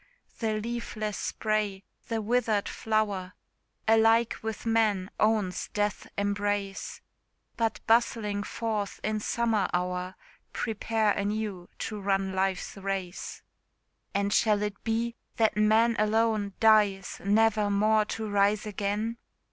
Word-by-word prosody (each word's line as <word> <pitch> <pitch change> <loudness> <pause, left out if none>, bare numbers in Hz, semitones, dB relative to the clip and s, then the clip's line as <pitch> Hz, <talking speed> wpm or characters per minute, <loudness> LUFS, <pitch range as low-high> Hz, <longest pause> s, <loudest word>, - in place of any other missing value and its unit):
The 220 -2 0
leafless 215 -2 -4
spray, 210 -3 -1 0.2
the 225 -2 -2
withered 220 -2 +1
flower, 205 -4 -1 0.5
Alike 225 +1 +4
with 220 0 -5
man 215 -4 +2
owns 210 -4 +1
death's 205 -1 -1
embrace; 205 -1 -2 0.5
But 225 -1 -1
bustling 225 -3 +2
forth, 210 -2 -3
in 215 0 0
summer 220 -2 +1
hour, 180 +1 -2 0.4
Prepare 220 -1 0
anew 200 -3 -2
to 210 -2 -4
run 195 -1 0
life's 190 0 -1
race. 195 -2 -4 0.7
And 200 0 0
shall 210 -2 +3
it 210 -1 -4
be, 230 +1 0 0.2
that 220 -1 +3
man 220 +2 +4
alone 215 -1 +2
Dies, 210 -3 +3
never 215 0 +3
more 215 +2 +3
to 220 +1 -4
rise 205 +1 +2
again? 210 +3 -2
210 Hz, 115 wpm, -28 LUFS, 200-225 Hz, 0.7 s, Alike